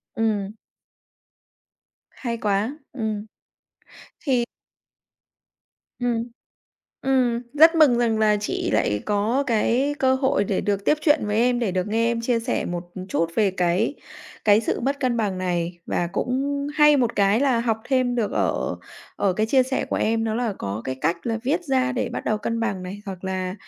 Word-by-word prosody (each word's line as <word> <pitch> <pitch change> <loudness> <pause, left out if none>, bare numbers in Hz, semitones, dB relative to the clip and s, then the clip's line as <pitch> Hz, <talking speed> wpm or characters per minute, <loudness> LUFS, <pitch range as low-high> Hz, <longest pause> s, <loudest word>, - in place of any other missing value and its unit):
Ừm. 210 -3 -1 1.6
Hay 235 -2 -4
quá, 210 +7 0 0.2
ừm. 220 -4 -3 1.0
Thì 255 -4 +1 1.6
Ừm, 240 -2 0 0.8
ừm, 255 -3 +1
rất 320 +3 +7
mừng 290 -7 +5
rằng 230 -2 +1
là 215 -1 +4
chị 210 - -2
lại 105 0 +1
có 215 +7 +1
cái 250 +4 +1
cơ 260 0 +3
hội 265 -5 +1
để 195 -1 -1
được 200 -1 -1
tiếp 300 - +3
chuyện 295 -6 +3
với 210 0 -1
em, 245 +1 +3
để 225 -6 -1
được 185 +1 -1
nghe 225 +2 +1
em 235 -1 -1
chia 230 0 0
sẻ 245 +2 -1
một, 175 -1 -3
ừm, 185 -1 -7
chút 170 -3 0
về 210 -3 +3
cái 180 +7 0 0.5
cái 210 0 +5
sự 230 - -2
mất 275 +3 -1
cân 250 -3 +1
bằng 205 -5 -1
này 175 -1 -2
và 175 - 0
cũng 280 +3 -1
hay 295 -1 +6
một 240 -4 0
cái 200 +3 +3
là 265 -4 +2
học 230 -2 0
thêm 255 -2 +1
được 230 -4 0
ở - - -1 0.4
ở 195 - +1
cái 215 +4 0
chia 260 +3 +4
sẻ 260 +1 -2
của - - -3
em, 225 +1 +1
đó 220 - -1
là 235 -2 -1
có 100 +2 -4
cái 130 - -2
cách 170 - -1
là 225 -1 -1
viết 310 +8 0
ra 265 -3 +1
để 250 - -1
bắt - - -4
đầu 215 - 0
cân 230 +2 -2
bằng 200 -5 -2
này, 190 +3 -7
hoặc 190 -1 -7
là 185 -1 -2
225 Hz, 180 wpm, -23 LUFS, 200-255 Hz, 1.6 s, rất